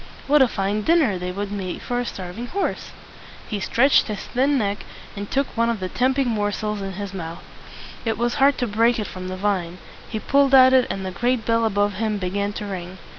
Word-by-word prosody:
What 295 +1 +4
a 265 - +6
fine 200 -1 -1
dinner 270 - +3
they 180 0 -3
would 200 +2 -4
be 185 -3 -4
for 245 0 -3
a 245 - -2
starving 190 +4 -6
horse! 390 +9 -2 0.6
He 210 - -3
stretched 265 +8 +3
his 210 -3 -4
thin 275 +3 +1
neck, 205 -3 -1 0.4
and 205 0 -6
took 275 +1 +1
one 230 0 +2
of 230 -3 -1
the 185 0 -3
tempting 260 +3 +1
morsels 210 -1 -1
in 195 -1 -4
his 200 0 -6
mouth. 165 -3 -6 0.6
It 225 -2 -1
was 240 0 0
hard 280 0 +5
to 245 - -1
break 230 +3 +2
it 215 - -2
from 185 -1 -7
the 185 0 -5
vine. 185 -3 -1 0.3
He 220 - -3
pulled 275 +2 +3
at 260 0 +8
it, 260 -1 +5
and 190 -1 -3
the 185 - -3
great 240 +3 0
bell 230 0 +2
above 205 -1 +1
him 215 -1 -1
began 200 +2 -2
to 210 - -5
ring. 185 -2 -6
210 Hz, 220 wpm, -23 LUFS, 195-245 Hz, 0.6 s, at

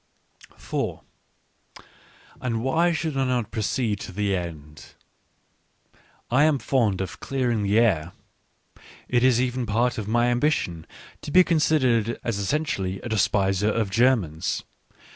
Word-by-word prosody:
4 - - -4 1.4
And 115 -2 -2
why 165 +6 +2
should 160 -2 -2
I 135 - +1
not 125 -4 -1
proceed 110 -1 -1
to - - -7
the 100 +1 -1
end? 75 -4 -8 1.4
I 130 +4 +4
am 155 -2 +3
fond 115 -8 0
of 95 - -6
clearing 125 -5 -1
the 100 +1 +1
air. 90 -8 +2 1.0
It 120 0 +1
is 130 -2 +4
even 125 -1 -1
part 120 +3 0
of 105 - -5
my 120 +2 +2
^ambition 120 - -1 0.4
to - - -7
be 185 +5 +6
considered 130 - +1
as 115 -4 -2
essentially 100 -5 -2
a 120 - -6
despiser 100 -1 +1
)of 110 -2 -1
Germans. 110 -10 +1
115 Hz, 130 wpm, -24 LUFS, 100-130 Hz, 1.4 s, be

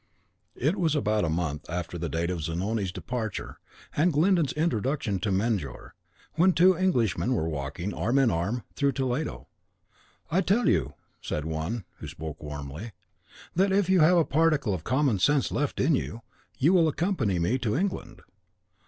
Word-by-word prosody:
It 150 +10 0
was 160 -4 +1
about 110 -7 +1
a - - -1
month 80 -3 -2
after 85 0 -4
the 85 -1 -3
date 85 +4 -1
of 85 -3 -3
Zanoni's 95 +5 -2
departure 115 +2 -5 0.4
and 170 +4 +3
Glyndon's 165 0 +3
introduction 135 - 0
to 100 +2 -1
Mejnour, 95 - -2 0.4
when 180 +3 +4
two 185 +2 +5
Englishmen 125 - +1
were 80 - 0
walking, 75 +6 -4
arm 115 +11 0
in 135 -4 +4
arm, 100 +8 -1
through 140 -1 +1
the 135 - -1
Toledo. 130 +4 -3 0.8
"I 180 +4 +3
tell 215 +5 +2
you," - - +1 0.3
said 75 - -3
one 80 +8 -3 0.2
(who - - -7
spoke 80 0 -7
warmly), 75 +8 -7 0.6
"that 190 +3 +3
if 195 -1 +2
you 190 - +5
have 170 +3 +6
a 165 - +4
particle 150 -7 +2
of 85 -4 -4
common 130 - +1
sense 145 +8 +2
left 145 -1 -1
in 165 - +3
you, 115 -4 -2 0.3
you 155 +8 +4
will 170 -3 +5
accompany 155 - 0
me 90 +10 +1
to 115 -2 -1
England. 175 - -3
115 Hz, 170 wpm, -27 LUFS, -, 0.8 s, have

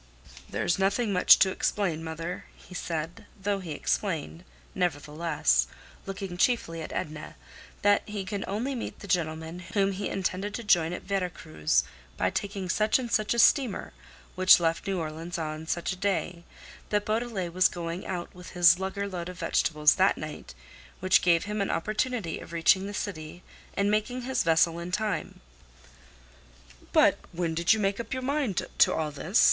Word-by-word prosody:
"There's 175 - 0
nothing 200 +3 +1
much 180 - +7
to 190 - +4
explain, 175 -5 -1
mother," 165 +2 -5
he - - -15
said; 165 -2 -4
though 200 0 -1
he 170 -5 -6
explained, 165 0 -2 0.3
nevertheless—looking 165 - -1
chiefly 180 -7 +1
at - - -7
Edna—that 155 +6 -2
he 205 -2 -4
could 200 +1 -3
only 225 +8 -2
meet 245 - -5
the 200 - -8
gentleman 160 -1 -1 0.2
whom 200 -1 +3
he 195 +1 -3
intended 195 +1 -2
to 235 - -5
join 170 -6 +3
at 175 - -5
Vera 195 -2 -1
Cruz 75 - 0 0.3
by 95 0 +1
taking 195 -2 -3
such 215 +4 +2
and 245 -3 -5
such 215 +2 +1
a - - -3
steamer, 245 -2 +3 0.4
which 185 0 +7
left 165 +3 0
New 195 -1 0
Orleans 165 +1 -4
on 155 0 -4
such 170 +2 -1
a 185 - -12
day; 175 -3 -1 0.4
that 205 0 0
Beaudelet 215 -6 -2
was 185 +1 +5
going 170 +1 -5
out 180 -2 -4
with 180 -1 -11
his 175 0 +6
lugger 195 +1 -3
load 180 -2 -5
of 180 - -9
vegetables 155 -3 +3
that 190 +1 +4
night, 155 - -8 0.4
which 185 0 +4
gave 170 -2 +3
him 210 0 -3
an 200 - -1
opportunity 215 +1 -1
of - - -11
reaching 190 +4 +3
the 205 - -6
city 175 -4 -5 0.3
and 200 +1 +2
making 230 +4 -1
his 260 +1 0
vessel 165 0 +3
in 170 +1 -6
time. 210 - -2 1.5
"But - - +5
when 170 -1 -1
did 170 +3 +3
you 220 - -1
make 200 0 0
up 230 +1 -4
your 260 0 -3
mind 275 - 0
to - - +6
all 155 -1 -1
this?" 165 +8 0
185 Hz, 170 wpm, -28 LUFS, 165-205 Hz, 1.5 s, much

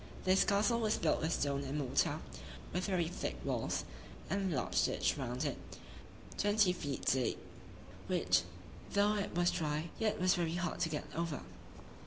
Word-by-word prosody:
This 185 +1 +5
castle 215 +4 +2
was 220 -2 +1
built 160 - +1
with 160 - 0
stone 140 -3 0
and 140 +2 -3
mortar, 145 +3 +1 0.5
with 180 +1 0
very 180 -4 +1
thick 175 - -3
walls, - - -1 0.5
and 195 -1 0
a - - 0
large 130 - +1
ditch - - +1
round 130 +1 -3
it, 140 - -2 0.8
twenty 205 -2 +4
feet 145 -6 -4
deep, 130 -1 +2 0.7
which, 90 0 +3 0.5
though 205 +1 +4
it 200 -4 -2
was 175 0 +3
dry, 155 +1 -2
yet 220 -2 +1
was 185 0 +4
very 170 -1 0
hard 175 -1 -2
to 170 -2 +1
get 150 -1 -3
over. 165 -3 -2
170 Hz, 165 wpm, -35 LUFS, 145-190 Hz, 0.8 s, This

